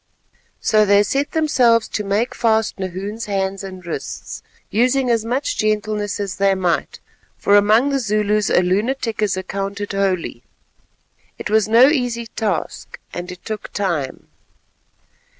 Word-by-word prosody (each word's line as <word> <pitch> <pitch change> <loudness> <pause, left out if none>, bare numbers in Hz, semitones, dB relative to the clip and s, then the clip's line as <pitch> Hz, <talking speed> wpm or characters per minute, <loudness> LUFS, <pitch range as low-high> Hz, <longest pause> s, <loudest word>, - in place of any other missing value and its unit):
So 215 -1 +4
they 205 0 +5
set 275 +7 -1
themselves 250 -8 +3
to 210 - -2
make 205 +5 0
fast 220 -3 +1
Nahoon's 195 +4 -4
hands 195 -1 -2
and 185 -2 -9
wrists, 170 - -6 0.3
using 250 +3 +2
as 230 -2 +1
much 250 +5 -2
gentleness 215 -1 -1
as 200 -2 -3
they 195 -1 +3
might, 180 -2 -1 0.4
for 200 - +3
among 215 +6 +4
the 275 -1 +1
Zulus 210 -2 +1
a 180 - +4
lunatic 220 +5 -1
is 200 -3 +1
accounted 195 +2 -4
holy. 185 -10 -1 1.0
It - - -5
was 220 -1 +3
no 230 +4 +7
easy 245 -5 -1
task, 215 -6 -3 0.2
and 175 +1 -5
it 180 - -12
took 215 -1 -5
time. 170 -10 -2
210 Hz, 140 wpm, -20 LUFS, 195-230 Hz, 1.0 s, no